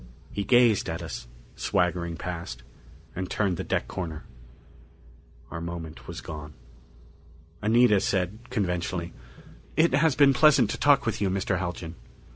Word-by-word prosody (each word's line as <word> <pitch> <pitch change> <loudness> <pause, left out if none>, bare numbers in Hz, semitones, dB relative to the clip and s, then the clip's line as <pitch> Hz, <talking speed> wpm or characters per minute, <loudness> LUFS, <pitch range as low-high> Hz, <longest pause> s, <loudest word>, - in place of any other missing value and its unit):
He 100 - -2
gazed 120 -1 +4
at - - -4
us, - - -6 0.3
swaggering 85 -1 0
past, 85 -9 -6 0.5
and 90 +1 -4
turned 95 -5 0
the - - -3
deck - - -1
corner. 80 -4 -5 1.3
Our 85 - -5
moment 85 -2 -7
was - - -6
gone. 75 -3 -8 1.1
Anita 110 -1 +5
said 95 +2 -1
conventionally, 90 -4 -2 0.6
"It 165 -1 +4
has 150 0 +3
been 140 0 +6
pleasant 135 -5 +5
to - - -3
talk 145 -1 +4
with 115 - -2
you, 100 - +2
Mr. 95 -1 0
Haljan." 85 -2 -4
95 Hz, 135 wpm, -27 LUFS, 85-115 Hz, 1.3 s, been